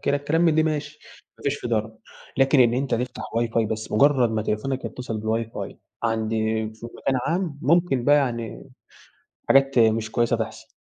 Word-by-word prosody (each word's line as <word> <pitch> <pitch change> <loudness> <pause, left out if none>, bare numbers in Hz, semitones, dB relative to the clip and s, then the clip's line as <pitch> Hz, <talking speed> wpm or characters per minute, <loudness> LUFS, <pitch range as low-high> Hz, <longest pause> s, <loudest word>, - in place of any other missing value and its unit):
كده 140 - +1
الكلام 145 +3 0
من 165 -2 +4
دي 160 - +4
ماشي، 150 -1 -3 0.4
ما - - -16
فيش 140 0 0
فيه - - -5
ضرر، 110 -1 -1 0.4
لكن 135 +1 +4
إن 120 -1 +5
أنتَ 135 +1 0
تفتح 125 0 -5
واي 115 0 +1
فاي 115 -1 +1
بس، 110 0 -5
مُجرَّد 130 0 +4
ما 110 -1 -1
تليفونك 130 +5 -2
يتِّصل 120 -3 -5
بالواي 110 +1 -1
فاي - - -6 0.2
عند 110 -1 0 0.4
في 110 +1 -9
مكان 135 - 0
عام، 165 -3 -1
ممكن 165 -5 +2
بقى 145 +2 +6
يعني 120 -2 -2 0.8
حاجات 135 -1 +4
مش 110 -1 +3
كويِّسة 120 0 +1
تحصل. - - -6
125 Hz, 185 wpm, -24 LUFS, 115-145 Hz, 0.8 s, بقى